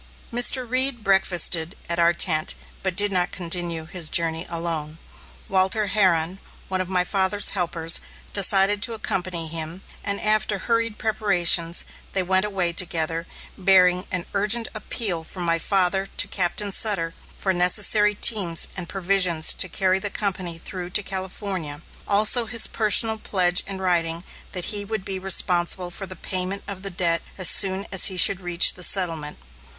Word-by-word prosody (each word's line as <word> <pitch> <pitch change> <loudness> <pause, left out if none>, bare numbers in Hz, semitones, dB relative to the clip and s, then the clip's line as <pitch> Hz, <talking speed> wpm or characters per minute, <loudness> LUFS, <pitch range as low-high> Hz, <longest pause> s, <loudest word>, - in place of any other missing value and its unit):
Mr. 245 +1 +4
Reed 255 -1 0
breakfasted 180 -3 +2
at 170 0 -3
our 170 0 +4
tent, 160 -2 +1 0.3
but 190 -2 -3
did 205 +1 +2
not 180 -1 0
continue 170 -2 -3
his 160 -1 -1
journey 165 0 0
alone. 165 -2 -4 0.5
Walter 190 +3 +1
Herron, 185 -3 +1 0.3
one 185 -1 -1
of 185 - -6
my 180 -1 +1
father's 195 +2 +1
helpers, 170 -3 0 0.3
decided 200 +1 +2
to 230 +1 0
accompany 180 -5 -2
him, 165 +3 -5 0.2
and 200 0 -1
after 215 -1 +1
hurried 230 +1 -2
preparations, 175 -6 +1 0.3
they 190 - 0
went 190 +2 0
away 190 -4 -1
together, 165 -1 -1 0.3
bearing 180 -1 +3
an 180 -2 -2
urgent 215 +3 +2
appeal 205 -5 -2
from 180 +2 -6
my 165 -1 0
father 190 +1 0
to - - +2
Captain 195 +2 -1
Sutter 190 -6 +1 0.2
for 190 - -1
necessary 210 +3 +3
teams 190 -6 +2
and 180 -2 -7
provisions 180 -4 +2
to 185 - +1
carry 190 +1 0
the 205 - -3
company 185 -5 -3
through 180 +1 -7
to 205 - -6
California, 185 -5 -3 0.2
also 215 +3 +3
his 230 +1 +4
personal 220 +1 +2
pledge 180 -4 0
in 195 -1 -6
writing 170 -2 0 0.3
that 180 -3 -1
he 205 -1 -3
would 210 -1 -5
be 190 -1 -5
responsible 180 -1 0
for 195 +2 -8
the 185 - -9
payment 185 +2 -2
of 195 -2 -6
the 195 - -4
debt 170 -2 0 0.2
as 185 -3 0
soon 195 0 +3
as 190 - +4
he 190 -3 -4
should 190 +1 +5
reach 175 -1 +4
the 180 - -11
settlement. 165 -5 +1
185 Hz, 160 wpm, -22 LUFS, 170-200 Hz, 0.5 s, should